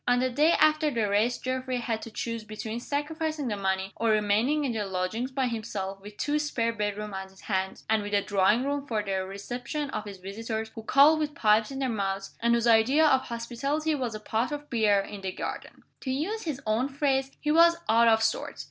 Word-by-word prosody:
On 245 0 +4
the 255 0 +1
day 300 +6 +4
after 310 0 +4
the 230 -6 0
race 210 +5 +2
Geoffrey 255 0 -2
had 230 -2 -2
to - - -7
choose 230 0 -4
between 215 +2 -5
sacrificing 295 +1 -2
the 210 - -1
money, 190 -1 -1
or 230 - 0
remaining 215 +8 +2
in 260 - 0
the 220 -2 -2
lodgings 195 +6 -2
by 265 0 -1
himself, 200 -5 -4
with 205 +1 -11
two 295 +1 0
spare 235 -6 -1
bedrooms 210 -1 -3
on 190 0 -5
his 190 0 -18
hands, 190 -2 -3
and 220 -1 +2
with 205 0 -2
a 200 - +2
drawing 205 +4 +3
room 285 0 -2
for 220 -4 -1
the 190 -2 -1
reception 245 +9 -5
of 210 - -4
his 200 -2 -8
visitors 220 +4 -5
who 225 - -7
called 285 +7 +5
with 300 0 -2
pipes 215 -6 +3
in 270 - -6
their 270 -1 0
mouths, 195 -4 -3
and 235 0 +3
whose 235 0 0
idea 235 +7 +5
of 265 -3 +3
hospitality 275 +7 -2
was 250 -6 -2
a - - -5
pot 225 +5 -1
of 295 0 -6
beer 215 -4 +3
in 200 0 -8
the 190 -1 -3
garden. - - -6 0.2
To 265 - -6
use 345 +12 -2
his 300 -5 -3
own 225 +5 +1
phrase, 270 -1 0
he 300 - 0
was 335 +2 +6
"out 230 +1 +5
of 225 -1 +4
sorts." 225 - -1
230 Hz, 220 wpm, -28 LUFS, 210-275 Hz, 0.2 s, was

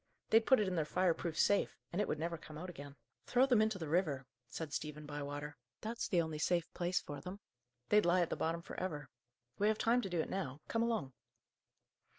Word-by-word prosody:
"They'd 225 0 +6
put 260 - +7
it 210 - +2
in 185 - -1
their 165 -3 +2
fire 180 +3 +2
proof 165 -1 -4
safe, 205 - +3 0.2
and 190 - +1
it - - 0
would - - -1
never 170 +2 -2
come 155 -2 -10
out 180 +3 -5
again." 140 -3 -9 0.3
"Throw 250 +2 +5
them 245 -5 +4
into 215 -2 +2
the 160 -4 -4
river," 150 -5 +1 0.2
said 155 +3 -5
Stephen 150 0 -4
Bywater. 145 0 -5 0.2
"That's 230 +2 -2
the 175 -3 +3
only 160 -1 -4
safe 170 +1 +1
place 180 0 +1
for 145 -1 -7
them: 185 +2 -7 0.5
they'd 210 0 +6
lie 180 +1 +5
at 170 - 0
the - - +1
bottom 165 +1 -1
for - - -8
ever. 150 -8 -3 0.5
We 205 - +4
have 215 0 +3
time 235 +3 +3
to 195 - -4
do 175 -2 -1
it - - -1
now. 150 -8 -3
Come 230 - 0
along." 225 - 0
170 Hz, 225 wpm, -36 LUFS, 150-205 Hz, 0.5 s, put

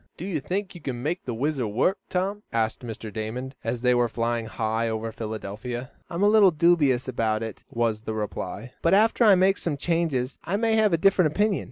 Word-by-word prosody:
"Do 170 - -6
you 185 -6 -1
think 190 +7 -3
you 175 - -11
can 125 -4 -4
make 170 +5 -2
the 125 - -3
WHIZZER 135 -1 -1
work, 130 - +1
Tom?" 195 +3 -1
asked 110 -1 0
Mr. 110 -2 -7
Damon, 120 +5 -4
as 115 +2 -3
they 125 0 +4
were 120 -1 +3
flying 115 0 -2
high 115 +1 -1
over 110 0 -3
Philadelphia. 110 +3 -5 0.2
"I'm 170 +3 -2
a - - +6
little 210 -2 +7
dubious 150 -7 +3
about 110 -3 0
it," 110 -3 -7
was 115 -2 -1
the 110 -1 -4
reply. 105 +2 -5
"But 170 +3 +4
after 225 +3 +4
I 210 -3 +7
make 190 +2 +3
some 155 -4 -2
changes 150 -6 -1
I 185 +5 -1
may 225 +1 +1
have 215 -2 +4
a 165 - +3
different 180 -1 +4
opinion. 205 +3 +1
130 Hz, 210 wpm, -25 LUFS, 115-180 Hz, 0.2 s, little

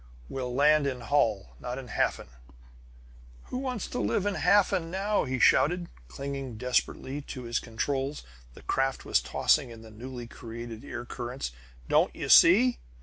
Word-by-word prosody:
We'll 130 -2 -4
land 150 +1 +4
in 130 -3 -3
Holl, 115 -6 0
not 125 +1 -5
in 130 -2 -8
Hafen!" - - -1 1.2
"Who 250 - -2
wants 255 -5 -3
to - - -3
live 115 - 0
in 205 - +1
Hafen 195 -5 +3
now?" 195 +2 0
he 130 -1 -2
shouted, 175 +8 +3 0.2
clinging 135 - -6
desperately 125 +3 -1
to 130 -2 -8
his 120 0 -1
controls. 135 +5 -3 0.3
The - - -14
craft 135 0 -1
was - - +2
tossing 140 -5 +2
in 115 -1 -11
the 110 - -13
newly 120 +2 -8
created 115 -1 -8
air 120 0 -6
currents. 125 - -5 0.4
"Don't - - +3
you - - -5
see? 235 +9 +7
135 Hz, 155 wpm, -28 LUFS, 120-155 Hz, 1.2 s, see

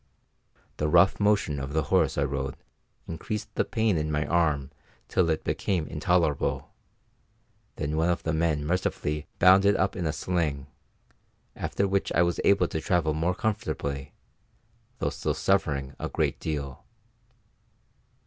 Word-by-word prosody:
The 75 - 0
rough 85 +4 +5
motion 100 -8 +2
of 70 +1 -5
the 80 0 +1
horse - - +3
I 70 - +2
rode 70 -1 -3 0.5
increased 105 +6 -5
the - - +1
pain 110 -5 +1
in 75 0 -2
my 75 0 0
arm 75 -5 +1 0.4
till 85 -2 +2
it 80 - 0
became 90 -5 -1
intolerable; 85 -3 0 1.0
then 75 +1 -2
one 80 +2 +2
of 85 - 0
the 80 - -1
men 80 -2 0
mercifully 75 -3 -1
bound 95 +2 +6
it 100 0 +4
up 95 - 0
in 90 -4 -2
a - - +1
sling, 75 -5 -1 0.9
after 100 - -1
which 100 0 0
I - - +4
was 85 0 0
able 100 -3 +4
to 80 - -3
travel 80 -1 +1
more 85 +4 0
comfortably, 70 -11 -3 0.8
though - - -1
still - - -2
suffering 70 -8 0
a - - -3
great - - -1
deal. 70 -4 -4
80 Hz, 150 wpm, -27 LUFS, 75-90 Hz, 1.0 s, bound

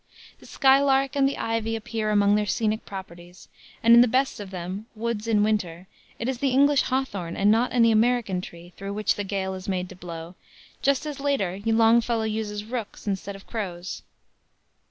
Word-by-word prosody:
The - - -16
skylark 270 0 +3
and 275 -1 +3
the - - -5
ivy 225 0 -1
appear 225 -1 -3
among 205 -1 +4
their 210 0 +1
scenic 220 +2 -1
properties, 175 -2 -10 0.4
and 230 +1 +7
in 235 - +9
the 245 - +5
best 260 +2 0
of 205 -2 -7
them, 185 +3 -6
Woods 230 -1 -3
in 210 -2 +3
Winter, 185 -5 -1 0.3
it 230 - -4
is 260 -2 -2
the 275 - +1
English 280 +2 +4
"hawthorn" 200 -10 -2
and 200 +1 +4
not 230 +3 +2
any 230 -2 +4
American 220 -4 +2
tree, 175 0 -11
through 195 0 -5
which 210 -1 +1
the 205 - -4
gale 190 -1 -3
is 190 +1 -7
made 185 -1 -1
to 185 - -11
blow, 170 -1 -8 0.5
just 280 +2 +1
as 295 -2 -5
later 235 -10 -1
Longfellow 225 +1 +3
uses 215 -1 -3
"rooks" 230 -2 -6
instead 200 0 -3
of 195 - -13
crows. 185 -5 -5
215 Hz, 185 wpm, -25 LUFS, 190-240 Hz, 0.5 s, in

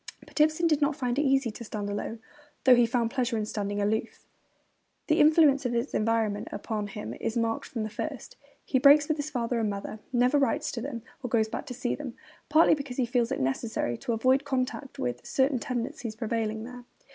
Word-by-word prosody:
But - - -2
Ibsen 310 +2 +3
did 310 -2 +3
not 290 0 +2
find 250 -2 -1
it - - +4
easy 270 -4 +2
to 225 - -9
stand 210 -2 -4
alone, 205 +2 -4 0.4
though 260 - +7
he 240 -1 +5
found 235 -1 0
pleasure 245 -3 0
in 215 - -1
standing 205 -1 -3
aloof. 220 +3 -2 0.8
The 315 +1 +2
influence 300 -2 +5
of 245 -2 -1
his 235 +4 -1
environment 215 -2 0
upon 210 0 -3
him 115 - -6
is 220 - -3
marked 230 -1 0
from 230 -3 -4
the 215 - -3
first. 275 +3 -6 0.3
He 260 - +1
breaks 290 +2 +7
with 310 - 0
his 295 0 -3
father 240 -4 -1
and 220 -2 0
mother, 200 +2 -5
never 250 +3 +3
writes 290 +2 0
to 240 - -5
them 235 -3 -5 0.2
or 250 - -4
goes 220 -1 +2
back 285 - -5
to 250 - -6
see 245 -1 -1
them; 270 -5 -6 0.3
partly 315 +2 +6
because 280 -4 -4
he 255 - +2
feels 240 -1 0
it - - -1
necessary 135 - -1
to 235 - -2
avoid 260 +5 +3
contact 265 0 -3
with 120 0 -3
'certain 265 -1 +1
tendencies 235 -2 -4
prevailing 220 -1 -2
there.' 245 +1 -9
245 Hz, 210 wpm, -28 LUFS, 220-275 Hz, 0.8 s, though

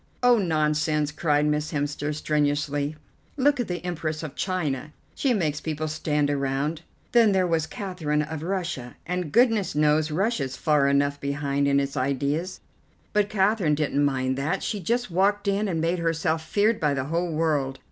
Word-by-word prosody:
"Oh, 245 -2 +6
nonsense!" 150 -3 +1
cried 150 -1 +1
Miss 150 0 0
Hemster 145 0 -2
strenuously; 145 -1 0 0.4
"look 280 0 +3
at 245 - -1
the 180 -1 -4
Empress 160 -3 -3
of 155 - -6
China. 155 -6 -2 0.2
She 275 - 0
makes 155 -9 0
people 155 0 -3
stand 150 -1 0
around. 140 +3 -1 0.3
Then 230 -4 +5
there 190 -1 +3
was 165 -2 0
Catherine 165 -7 -2
of 150 0 -6
Russia, 170 -8 -3
and 180 -3 -3
goodness 225 - +3
knows 150 +1 +3
Russia's 155 - -1
far 150 -3 +3
enough 140 0 +2
behind 140 0 0
in 140 0 +3
its 140 0 -2
ideas! 140 +7 -1 0.5
But 210 -1 +2
Catherine 195 -6 +2
didn't 145 -1 0
mind 130 -1 0
that; 160 +8 -1
she 210 - -2
just 235 +4 -1
walked 200 +3 +2
in, 200 +1 +1
and 170 -4 -1
made 170 +2 0
herself 165 -1 0
feared 210 +7 +1
by 150 -2 +1
the 130 - -1
whole 170 +3 -1
world. 150 -4 0
155 Hz, 165 wpm, -25 LUFS, 145-185 Hz, 0.5 s, Oh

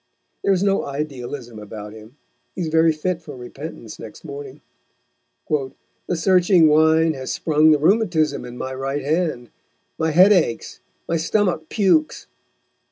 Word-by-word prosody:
There - - +2
is 190 0 +2
no 195 -1 +1
idealism 135 -5 -6
about 105 0 -9
him. 110 +3 -14 0.4
He 185 - -4
is 165 - -2
very 160 +1 +4
fit 170 +3 -3
for 150 -4 -10
repentance 135 +5 -9
next - - -11
morning. 425 -1 -9 0.9
"The 145 +3 -4
searching 180 0 +4
Wine 160 +1 +4
has 130 -2 -5
sprung 155 -1 +3
the 155 - +5
Rheumatism 170 -1 +1
in 125 0 -9
my 130 +1 -5
Right 135 +2 -3
Hand, 155 -5 -1 0.5
my 160 - +1
Head 180 +6 +6
aches, 160 - -1 0.3
my 165 - 0
Stomach 170 -1 0
pukes." 225 +10 +1
155 Hz, 145 wpm, -21 LUFS, 135-180 Hz, 0.9 s, Head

